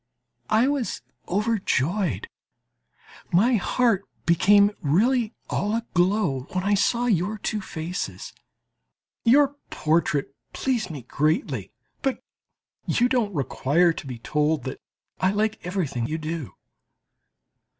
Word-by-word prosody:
I 220 Hz, +4 st, +4 dB
was 280 Hz, -4 st, -2 dB, 0.2 s
overjoyed, 185 Hz, -, 0 dB, 1.0 s
my 220 Hz, +9 st, +4 dB
heart 220 Hz, 0 st, +1 dB, 0.2 s
became 200 Hz, +4 st, +5 dB
really 215 Hz, -, +2 dB
all 210 Hz, +2 st, -1 dB
aglow 180 Hz, -, 0 dB
when 185 Hz, 0 st, -1 dB
I 205 Hz, +1 st, +2 dB
saw 235 Hz, +4 st, +2 dB
your 205 Hz, -1 st, +1 dB
two 210 Hz, +1 st, -2 dB
faces. 160 Hz, -, -5 dB, 0.9 s
Your 280 Hz, +4 st, +4 dB
portrait, 155 Hz, -2 st, +1 dB
as 135 Hz, -, -31 dB
you -, -, -42 dB
must -, -, -21 dB
know, -, -, -7 dB
pleased 240 Hz, -7 st, 0 dB
me 150 Hz, -5 st, -6 dB
greatly. 155 Hz, -, -1 dB, 0.3 s
But 270 Hz, -3 st, -1 dB, 0.6 s
you 245 Hz, -, +3 dB
don't 225 Hz, -7 st, 0 dB
require 155 Hz, +4 st, +2 dB
to 160 Hz, -, -8 dB
be 125 Hz, -2 st, -5 dB
told 150 Hz, +3 st, 0 dB
that 130 Hz, +2 st, -6 dB, 0.4 s
I 185 Hz, -, +3 dB
like 215 Hz, +1 st, -1 dB
everything 150 Hz, -10 st, -2 dB
you 155 Hz, -, -2 dB
do. 155 Hz, -3 st, -5 dB
185 Hz, 125 wpm, -25 LUFS, 155-220 Hz, 1.0 s, became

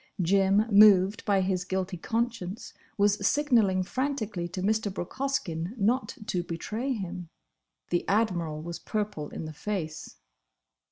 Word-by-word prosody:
Jim—moved 200 Hz, +2 st, +5 dB
by 200 Hz, -2 st, +3 dB
his 185 Hz, -1 st, 0 dB
guilty 190 Hz, 0 st, -2 dB
conscience—was 210 Hz, 0 st, -2 dB
signalling 230 Hz, -11 st, +3 dB
frantically 220 Hz, -7 st, -2 dB
to 185 Hz, +1 st, -5 dB
Mr. 215 Hz, 0 st, +1 dB
Brooke 180 Hz, -2 st, -6 dB
Hoskyn 215 Hz, -9 st, -2 dB
not 230 Hz, +2 st, 0 dB
to 180 Hz, -4 st, -1 dB
betray 210 Hz, +10 st, -4 dB
him. 180 Hz, -5 st, -6 dB, 0.6 s
The 175 Hz, -, 0 dB
Admiral 175 Hz, -8 st, 0 dB
was 170 Hz, 0 st, -6 dB
purple 205 Hz, -9 st, -3 dB
in -, -, -6 dB
the 155 Hz, -, -7 dB
face. 160 Hz, -2 st, -5 dB
195 Hz, 120 wpm, -28 LUFS, 175-220 Hz, 0.6 s, Jim—moved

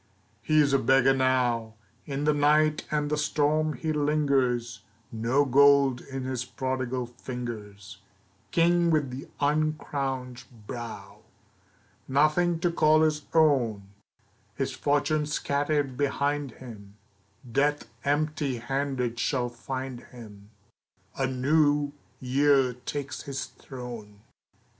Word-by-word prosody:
He 155 Hz, 0 st, +2 dB
is 140 Hz, -2 st, +2 dB
a 135 Hz, -, +4 dB
beggar 135 Hz, +2 st, +4 dB
now. 125 Hz, -4 st, +1 dB, 0.3 s
In 140 Hz, 0 st, -3 dB
the 150 Hz, 0 st, +3 dB
night 150 Hz, +1 st, +2 dB
and 150 Hz, -1 st, -1 dB
the 150 Hz, -, +1 dB
storm 155 Hz, +1 st, +1 dB
he 155 Hz, +4 st, -3 dB
lingers, 140 Hz, -6 st, 0 dB, 0.3 s
No 120 Hz, +6 st, +1 dB
gold 140 Hz, -1 st, +5 dB
in 135 Hz, -1 st, -6 dB
his 130 Hz, -1 st, -3 dB
prodigal 130 Hz, -1 st, -3 dB
fingers, 120 Hz, -5 st, -8 dB, 0.5 s
King 170 Hz, 0 st, +3 dB
with 150 Hz, -5 st, +1 dB
the 130 Hz, +2 st, -7 dB
uncrowned 140 Hz, -4 st, -1 dB, 0.2 s
brow. 120 Hz, 0 st, -8 dB, 0.9 s
Nothing 155 Hz, +5 st, +2 dB
to 175 Hz, -1 st, +2 dB
call 155 Hz, -1 st, +4 dB
his 150 Hz, -1 st, 0 dB
own! 120 Hz, -11 st, +2 dB, 0.7 s
His -, -, -2 dB
fortune 150 Hz, +1 st, 0 dB
scattered 145 Hz, -2 st, -1 dB
behind 145 Hz, -1 st, -1 dB
him; 105 Hz, -5 st, -12 dB, 0.6 s
Death 145 Hz, +3 st, +1 dB, 0.2 s
empty 145 Hz, -2 st, 0 dB
handed 125 Hz, -1 st, -2 dB
shall 125 Hz, -1 st, 0 dB
find 130 Hz, +1 st, -6 dB
him, 105 Hz, -5 st, -13 dB, 0.7 s
A 135 Hz, -, 0 dB
New 145 Hz, +2 st, +2 dB, 0.3 s
Year 135 Hz, 0 st, +3 dB
takes 135 Hz, +2 st, -5 dB
his 140 Hz, -1 st, -4 dB
throne. 120 Hz, -6 st, -10 dB
135 Hz, 110 wpm, -27 LUFS, 125-150 Hz, 0.9 s, gold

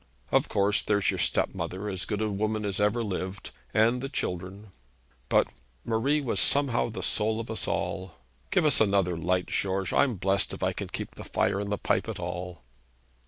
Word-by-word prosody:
Of -, -, +3 dB
course 100 Hz, +1 st, +2 dB
there's 100 Hz, -1 st, +2 dB
your -, -, -4 dB
stepmother, 95 Hz, +3 st, 0 dB
as 95 Hz, -3 st, -1 dB
good 105 Hz, 0 st, -2 dB
a 110 Hz, -, -1 dB
woman 110 Hz, +1 st, -1 dB
as 100 Hz, -1 st, -1 dB
ever 105 Hz, +3 st, +2 dB
lived, 95 Hz, -1 st, -4 dB, 0.2 s
and 115 Hz, +3 st, +3 dB
the 135 Hz, -, -4 dB
children; 95 Hz, -3 st, -4 dB, 0.6 s
but -, -, +4 dB, 0.4 s
Marie 135 Hz, +7 st, +1 dB
was 130 Hz, -, 0 dB
somehow 140 Hz, -5 st, +3 dB
the 110 Hz, -, -5 dB
soul 110 Hz, +1 st, +1 dB
of 115 Hz, 0 st, -5 dB
us 110 Hz, -, -1 dB
all. 95 Hz, -3 st, -2 dB, 0.3 s
Give 175 Hz, -, +2 dB
us 145 Hz, -7 st, +5 dB
another 100 Hz, -4 st, +2 dB
light, 90 Hz, +2 st, 0 dB
George. 95 Hz, -1 st, -1 dB
I'm 135 Hz, -5 st, +3 dB
blessed 95 Hz, +1 st, +1 dB
if -, -, -7 dB
I -, -, +1 dB
can -, -, -4 dB
keep -, -, -6 dB
the -, -, -9 dB
fire 100 Hz, -, 0 dB
in 100 Hz, 0 st, -3 dB
the 105 Hz, -, 0 dB
pipe -, -, 0 dB
at -, -, -5 dB
all.' 90 Hz, -5 st, -5 dB
105 Hz, 190 wpm, -28 LUFS, 95-110 Hz, 0.6 s, us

